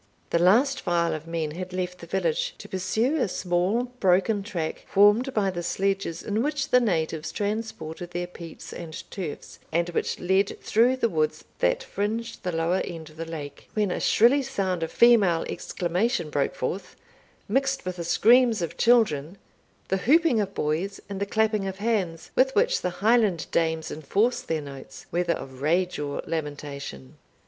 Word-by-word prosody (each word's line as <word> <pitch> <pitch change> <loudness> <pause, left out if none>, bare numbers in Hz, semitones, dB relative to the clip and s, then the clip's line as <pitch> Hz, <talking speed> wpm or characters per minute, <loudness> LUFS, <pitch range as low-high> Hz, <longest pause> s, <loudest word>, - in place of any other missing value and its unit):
The 170 - +3
last 245 +10 +4
file 170 -2 +1
of 155 +1 -6
men 165 -2 -2
had 180 +3 -6
left 180 0 -3
the 170 - -10
village, 170 -3 -1
to - - -10
pursue 225 - 0
a 260 - +1
small 185 +5 0 0.2
broken 195 +3 +3
track, 175 -6 -4
formed 210 +6 +5
by 205 -6 +1
the 175 -1 -4
sledges 195 -1 -1
in 215 +1 -1
which 295 +2 -1
the 250 - +6
natives 160 -7 -1
transported 200 -6 -4
their 175 0 -3
peats 170 -2 -10
and 165 -2 -7 0.2
turfs, 175 -7 -6
and 170 +2 +1
which 175 - -2
led 190 +2 +1
through 235 +4 +3
the 245 - +2
woods 155 -6 -1 0.2
that - - +2
fringed 225 +3 -3
the 180 - -2
lower 165 +3 +1
end 160 -3 -7
of 155 - -19
the 165 - -4
lake, 150 -3 -8
when 210 -3 +1
a - - -2
shrilly 245 +6 +4
sound 190 -8 -2
of 165 - -2
female 205 -9 +5
exclamation 175 -1 -1
broke 140 -2 0
forth, 180 +9 -4 0.5
mixed 270 +2 0
with 185 0 -4
the 170 - -3
screams 230 +3 +4
of 170 - -5
children, 200 -9 +3 0.5
the 190 - +1
whooping 300 - +4
of 200 -1 -2
boys, 165 +7 -1
and 200 -1 -4
the 200 - -1
clapping 215 -1 +1
of 190 0 -5
hands, 195 -7 -1
with 265 +1 +3
which - - +3
the - - 0 0.2
Highland 220 -7 +3
dames 160 -1 0
enforce 200 - 0
their 160 -1 -2
notes, 140 -2 -10
whether 175 0 +1
of 130 -1 -8
rage 175 +5 +1
or 145 -1 -3
lamentation. 145 - -6
185 Hz, 175 wpm, -26 LUFS, 165-220 Hz, 0.5 s, the